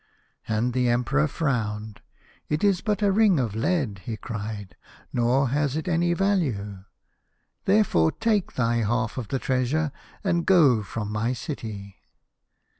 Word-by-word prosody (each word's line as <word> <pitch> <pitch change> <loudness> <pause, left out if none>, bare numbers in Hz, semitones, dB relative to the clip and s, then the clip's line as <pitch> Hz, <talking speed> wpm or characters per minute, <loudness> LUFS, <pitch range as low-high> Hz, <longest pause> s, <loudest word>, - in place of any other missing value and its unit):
" - - -46
And 115 +3 0
the 125 -1 +2
Emperor 135 +6 +2
frowned. 110 -9 -2 0.2
' - - -29
It 150 +4 -1
is 195 -3 +3
but 210 -1 -1
a 200 - +4
ring 200 -5 +4
of 115 -6 -1
lead,' 115 - 0
he 110 -2 -4
cried, 105 -3 -6 0.2
' - - -27
nor 125 +2 +2
has 145 +1 0
it 160 +3 -3
any 175 0 +2
value. 125 - -1 0.8
Therefore 195 - +3
take 220 -4 0
thy 120 -2 +1
half 115 +2 0
of 120 - -5
the 135 - -1
treasure 135 +4 0 0.3
and 170 -4 +1
go 150 - +5
from 105 0 -5
my 110 +4 0
city. 105 - -6
125 Hz, 155 wpm, -25 LUFS, 110-170 Hz, 0.8 s, go